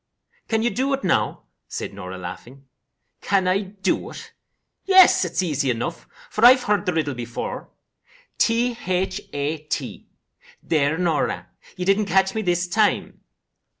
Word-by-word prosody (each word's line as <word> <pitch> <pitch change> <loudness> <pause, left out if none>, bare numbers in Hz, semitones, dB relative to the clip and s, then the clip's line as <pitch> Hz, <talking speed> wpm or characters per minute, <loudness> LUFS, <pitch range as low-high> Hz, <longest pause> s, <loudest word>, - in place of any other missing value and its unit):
"CAN 225 -1 0
you 240 - +1
do 265 +2 -1
it 275 - -2
now?" 175 - 0 0.2
said - - -5
Norah, 95 -1 -7
laughing. 120 +10 -9 0.6
"Can 195 -2 +1
I 185 +2 +3
do 195 0 -2
it? - - -11 0.5
Yes, 350 - +5
easy 145 -5 0
enough, 125 +8 -3 0.2
for 215 - -2
I've 250 +1 +8
heard 205 -3 0
the 180 - +2
riddle 155 -3 -1
before. 120 -1 -6 0.7
T 235 +1 +2
h 185 +2 -1
a 145 +2 -2
t. 150 0 -5 0.6
There, 155 -1 +1
Norah, 170 -4 -1 0.3
you 180 - -3
didn't 195 +2 +3
catch 190 -1 +2
me 220 - -1
this 175 -2 0
time." 210 +3 0
180 Hz, 145 wpm, -23 LUFS, 145-210 Hz, 0.7 s, I've